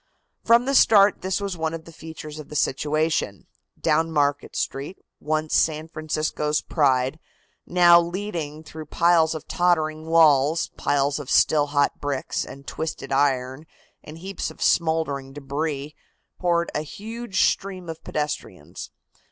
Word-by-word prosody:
From 235 +2 +4
the 275 - 0
start 205 -6 +5
this 190 +2 -1
was 200 -2 -3
one 160 -1 -2
of 160 - -9
the 165 - -12
features 155 -1 -9
of 150 - -10
the 150 - -9
situation. 150 - 0 0.3
Down 165 0 +1
Market 145 -2 0
Street, 140 +8 -3 0.2
once 155 +1 -2
San 155 0 +1
Francisco's 155 -1 -1
pride, 135 -1 +1 0.5
now 175 -1 +6
leading 170 -4 -5
through 155 -1 -10
piles 165 0 +3
of 155 - -8
tottering 160 -3 0
walls, 160 -1 +4
piles 140 0 0
of 145 -2 -8
still 145 +1 +3
hot 145 0 +1
bricks 140 -2 -2
and 135 +1 -11
twisted 155 -3 -5
iron 135 +1 0 0.4
and 155 - -10
heaps 190 +3 -5
of - - -14
smouldering 160 -5 0
debris, 145 +1 -4 0.5
poured 170 -1 +1
a 150 - -1
huge 215 +5 -3
stream 190 -2 -2
of 160 -1 -8
pedestrians. 150 -1 -5
155 Hz, 140 wpm, -24 LUFS, 145-170 Hz, 0.5 s, now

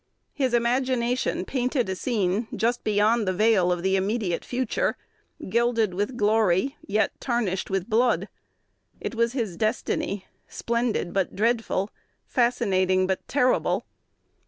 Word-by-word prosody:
His 260 -4 +1
imagination 245 +1 0
painted 250 -2 0
a 190 - -2
scene 210 0 0
just 240 +2 0
beyond 215 +1 +2
the 185 - +1
veil 190 -2 +3
of 175 -1 -1
the 190 0 +2
immediate 195 -2 -1
future, 255 - -1 0.5
gilded 230 -1 +1
with 205 +7 -2
glory 215 +3 +2
yet 210 0 +1
tarnished 230 -7 -1
with 195 -1 -1
blood. 235 +2 +2 0.7
It - - -4
was 235 +1 +1
his 225 -9 -2
"destiny," 205 -2 -1 0.2
splendid 235 -6 -1
but 195 -3 -1
dreadful, 220 -2 0 0.3
fascinating 190 -7 +2
but 190 0 -2
terrible. 255 -2 +1
225 Hz, 125 wpm, -25 LUFS, 190-240 Hz, 0.7 s, veil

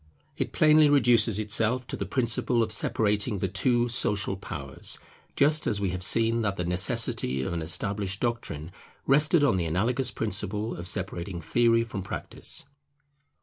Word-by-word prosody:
It - - -3
plainly 155 -1 +5
reduces 120 -6 +3
itself 110 +4 0
to - - -5
the 100 - -5
principle 120 +1 0
of 110 - -4
separating 105 0 +1
the 95 - -2
two 120 +6 +1
social 105 -4 0
powers; 70 -8 -5 0.4
just 150 +2 +2
as 105 - 0
we 100 -2 -1
have 90 0 -5
seen 115 +4 +3
that 100 -3 -1
the 90 - -3
necessity 85 -6 +1
of 75 - -4
an 85 - -3
established 100 +4 -1
doctrine 105 -10 -4 0.3
rested 150 +3 +4
on 135 -10 +2
the 85 - -1
analogous 115 - 0
principle 105 0 -2
of 85 +1 -7
separating 90 -1 -2
theory 115 +7 +2
from 105 -4 -6
practice. 100 - -4
105 Hz, 155 wpm, -26 LUFS, 95-120 Hz, 0.4 s, plainly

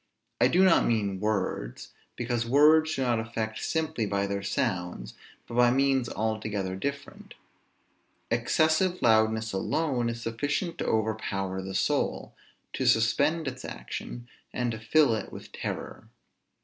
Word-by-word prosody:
I - - +5
do 185 +2 +4
not 185 -3 +5
mean 100 -5 0
words, 95 - -2 0.2
because 120 -1 -1
words 155 +5 +5
do 135 - -1
not 120 -3 +1
affect 110 -1 -4
simply 160 -9 -1
by 100 0 0
their 100 0 -2
sounds, 90 - -2 0.3
but - - -9
by 120 0 +5
means 135 -1 +2
altogether 110 -3 -2
different. 140 +8 -6 1.0
Excessive 155 +9 +2
loudness 110 -1 +3
alone 125 +4 0
is 115 0 -4
sufficient 145 +9 -2
to - - -2
overpower 100 -4 -1
the 95 0 -6
soul, 90 - 0 0.4
to - - -1
suspend 145 +8 +2
its 130 -1 -5
action, 120 - -7 0.2
and 125 -1 -1
to 110 - -5
fill 130 +3 +3
it 110 - -4
with - - -10
terror. - - -6
115 Hz, 135 wpm, -28 LUFS, 105-140 Hz, 1.0 s, I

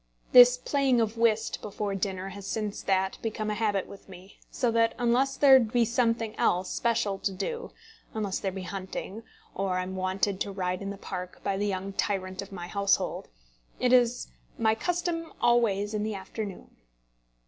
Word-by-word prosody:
This 245 0 +9
playing 270 -1 +1
of 220 -1 0
whist 230 -1 +1
before 205 -1 -3
dinner 190 -1 -3
has 195 0 -9
since 210 -1 -3
that 190 0 0
become 215 -1 -2
a - - 0
habit 205 -3 0
with 200 - -13
me, 185 +1 -14
so 245 -3 0
that 230 0 +2
unless 245 +3 +1
there 270 -2 +8
be 235 0 +2
something 230 -1 0
else 180 +1 +1
special 225 -4 0
to 200 - -1
do 470 - -4 0.5
unless 205 -3 -2
there 195 - -2
be 190 0 -6
hunting, 190 +3 -6 0.3
or 190 -1 -1
I 185 - 0
am 190 +1 -6
wanted 190 +1 -1
to 200 - -1
ride 185 -1 -2
in 200 - -4
the 200 - -6
park 180 -2 -7
by 195 - 0
the 205 +1 -1
young 195 0 -3
tyrant 190 -1 -2
of 200 - -10
my 175 -3 -6
household 200 +2 0 0.5
it 250 0 +2
is 245 -1 +3 0.3
"my 220 -1 +3
custom 340 +5 -2
always 220 -4 +2
in 210 - -1
the 215 0 -2
afternoon." 195 +1 -7
205 Hz, 180 wpm, -28 LUFS, 190-235 Hz, 0.5 s, This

